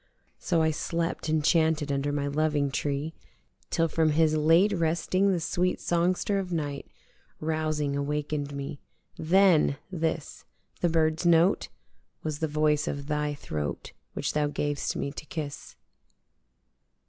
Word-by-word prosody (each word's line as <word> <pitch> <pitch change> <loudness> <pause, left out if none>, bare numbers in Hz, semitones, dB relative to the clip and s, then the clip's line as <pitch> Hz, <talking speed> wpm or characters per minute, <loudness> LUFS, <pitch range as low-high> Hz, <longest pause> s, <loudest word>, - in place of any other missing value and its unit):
So 165 -3 +1
I 160 - +3
slept 165 +1 -2
enchanted 155 -1 +2
under 140 +1 0
my 145 -1 -1
loving 145 -1 +1
tree 145 +3 -2 0.6
Till 165 0 +2
from 160 -1 +2
his 155 0 +3
late 165 +7 +4
resting 170 +3 +1
the 180 - +1
sweet 180 +2 0
songster 180 +3 +1
of 185 -2 -4
night 145 -4 -3 0.5
Rousing 155 -2 -1
awaken'd 145 0 -2
me: 140 0 -5 0.4
Then! 170 -4 +4
this 165 -3 -3 0.4
the 175 - +2
birdis 160 +1 +1
note 170 +3 +4 0.6
Was 155 -2 -3
the 160 - 0
voice 150 +1 +1
of 140 0 -3
thy 150 0 -1
throat 75 - -5 0.2
which - - -2
thou 150 -1 +1
gav'st 145 0 -2
me 140 - -2
to 150 - -8
kiss. 150 -3 -6
155 Hz, 135 wpm, -28 LUFS, 145-165 Hz, 0.6 s, late